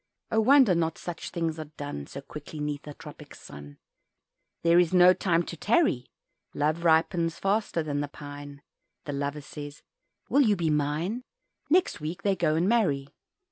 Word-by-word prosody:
Oh! 220 - +3
wonder 255 -2 +6
not 165 -1 0
such 175 -2 -6
things 165 -2 -2
are 155 - -4
done 145 - -6
So 140 - -8
quickly 150 +2 -9
'neath 150 0 -4
a 145 - -8
tropic - - -12
sun 70 0 -12 0.9
"There 170 +1 +5
is 180 +1 +2
no 180 0 +8
time 175 -3 +1
to 170 - -7
tarry" 200 - +1 0.5
Love 155 +3 0
ripens 165 0 +2
faster 195 -4 0
than 145 -1 -2
the 145 - -2
pine, 145 0 -10 0.4
The 145 - -4
Lover 140 +1 -3
says 145 0 -9 0.4
"Will 285 - +4
you 215 -6 +4
be 165 -4 0
mine?" 150 - -1 0.5
Next 335 - +2
week 160 +3 -5
they 200 -1 +2
go 165 -4 +1
and 170 +3 +1
marry. 165 -12 +1
160 Hz, 170 wpm, -27 LUFS, 145-180 Hz, 0.9 s, no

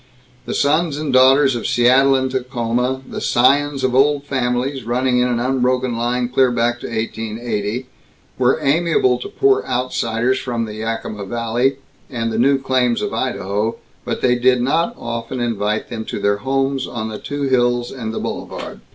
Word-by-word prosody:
The - - -2
sons 150 +1 +1
and 150 -3 -3
daughters 130 +1 +5
of 120 - -3
Seattle 130 +3 +4
and 130 0 0
Tacoma, 125 0 -1
the - - -6
scions 140 +3 +2
of 130 -1 +1
old 140 +2 +3
families 130 -1 -1
running 125 +2 +1
in 125 - +3
an 120 -1 0
unbroken 125 0 0
line 120 +1 0
clear 130 +1 +3
back 120 0 0
to - - -6
1880, 110 +1 -3 0.5
were 130 +1 +3
amiable 140 -4 +2
to - - -6
poor 405 0 +2
outsiders 125 0 0
from 120 -2 -2
the 105 - -7
Yakima 110 -2 -4
valley 120 +4 0 0.3
and 115 -3 -2
the 110 - -1
new 135 +3 +4
claims 130 -3 0
of - - -3
Idaho, 105 +4 -1 0.3
but - - -3
they 125 - +3
did 125 0 +3
not 165 - +1
often 115 +2 -5
invite 110 -3 -1
them 110 -2 -4
to - - -5
their 100 0 +1
homes 135 +2 -1
on 110 -2 -4
the 110 - -6
two 145 0 -4
hills 120 -2 +1
and 115 -4 -5
the - - -4
Boulevard. - - -6
125 Hz, 170 wpm, -19 LUFS, 115-135 Hz, 0.5 s, daughters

